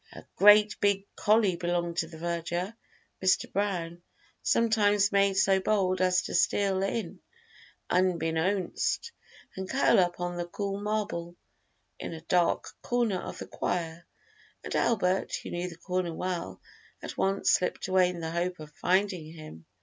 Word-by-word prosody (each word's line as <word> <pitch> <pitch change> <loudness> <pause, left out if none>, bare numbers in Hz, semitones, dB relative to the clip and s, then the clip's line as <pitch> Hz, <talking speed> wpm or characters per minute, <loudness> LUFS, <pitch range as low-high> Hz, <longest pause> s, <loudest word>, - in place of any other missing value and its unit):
A - - -11
great 210 +1 +6
big 200 -1 +1
collie 210 -4 +3
belonging 175 0 -1
to 165 -1 -1
the 160 -1 -11
verger, 170 +4 -3 0.5
Mr. 185 - +2
Brown, 175 -4 -2 0.4
sometimes 210 -3 +3
made 200 -1 +3
so 190 0 +4
bold 185 -2 +1
as 185 0 +3
to - - -6
steal 195 -2 +2
in 195 -2 -3 0.7
"unbeknownst" 180 - 0 0.4
and 190 0 -5
curl 270 -6 +4
up 175 -1 +1
on 175 0 -3
the 175 0 -3
cool 200 +2 -4
marble 205 -5 -3 0.6
in - - -5
a 160 - -8
dark 175 +1 +1
corner 235 -6 0
of - - -7
the - - -6
choir, 170 -1 -3 0.6
and - - -5
Albert, 190 -5 +1
who - - -7
knew 175 +1 -3
the 165 - -11
corner 180 -1 -2
well, 180 0 -4 0.4
at - - -6
once 195 +1 +1
slipped 180 - 0
away 185 -1 +4
in 175 -1 -6
the 160 0 -4
hope 175 +1 -2
of 155 -1 -10
finding 180 -1 0
him. 155 - -12
185 Hz, 150 wpm, -28 LUFS, 170-200 Hz, 0.7 s, great